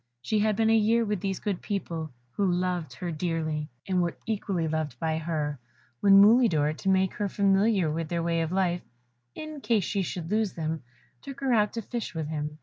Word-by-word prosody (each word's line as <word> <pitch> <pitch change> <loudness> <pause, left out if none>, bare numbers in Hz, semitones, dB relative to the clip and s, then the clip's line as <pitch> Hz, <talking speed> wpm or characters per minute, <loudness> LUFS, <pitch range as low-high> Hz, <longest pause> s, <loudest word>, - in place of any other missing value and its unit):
She 215 - +1
had 215 0 +2
been 225 +1 +3
a - - +5
year 225 +2 +3
with 210 -2 -1
these 195 -2 -2
good 200 -4 -2
people, 165 -6 -3 0.2
who 195 +6 +1
loved 175 -5 -1
her 175 +6 -4
dearly, 155 -2 -2 0.2
and 185 -2 +2
were 170 -1 -1
equally 195 -6 -1
loved 155 -5 -2
by 160 +3 -1
her, 155 -3 -2 0.4
when 195 +4 +7
Mulidor, 200 - +5
to 195 +5 -3
make 190 -1 +3
her 205 -1 -2
familiar 195 -1 +3
with 160 0 -3
their 170 -1 -1
way 165 0 +1
of 165 0 -2
life, 180 -2 +1 0.5
in 310 -2 -7
case 225 -6 +2
she 195 - -1
should 175 -1 -4
lose 215 -2 +1
them, 160 -1 -3 0.4
took 275 -1 -9
her 265 -2 +2
out 210 -2 +3
to 230 - -4
fish 235 -3 -5
with 160 -2 -3
him. 150 -1 -4
185 Hz, 205 wpm, -27 LUFS, 160-210 Hz, 0.5 s, when